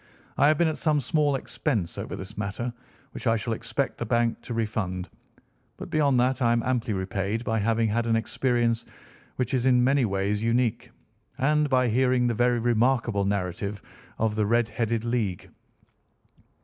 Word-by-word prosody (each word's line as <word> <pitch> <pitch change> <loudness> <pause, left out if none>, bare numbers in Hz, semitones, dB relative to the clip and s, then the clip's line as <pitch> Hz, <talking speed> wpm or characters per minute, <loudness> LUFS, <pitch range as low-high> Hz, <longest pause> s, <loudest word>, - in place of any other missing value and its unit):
"I 145 - +4
have 155 0 +4
been 170 - +3
at 155 - -2
some 155 -2 +2
small 145 +1 +1
expense 115 - -2
over - - -5
this 95 +3 -9
matter, 110 +4 -3 0.4
which - - -6
I 115 - +4
shall 115 +1 -2
expect 115 +4 -3
the 120 - -2
bank 120 0 +1
to 120 - -6
refund, 95 -5 -2 0.7
but - - -8
beyond 140 -5 +3
that 130 +1 +1
I 115 -1 +3
am 115 -1 +1
amply 125 -3 -1
repaid 100 +3 -2
by 110 -1 0
having 115 +2 +1
had 115 +2 0
an 115 - +2
experience 115 +1 0 0.5
which 125 0 -2
is 130 0 +1
in 125 -1 +4
many 135 0 +3
ways 100 +1 -1
unique, 115 0 0 0.5
and 150 +2 +2
by 130 -2 +3
hearing 125 +1 +2
the 120 - +1
very 120 +2 +2
remarkable 115 -3 +1
narrative 100 +1 -2 0.4
of 110 -1 0
the 105 -1 +1
Red 115 +1 +2
headed 115 0 -1
League." 115 -6 -2
115 Hz, 175 wpm, -26 LUFS, 110-125 Hz, 0.7 s, I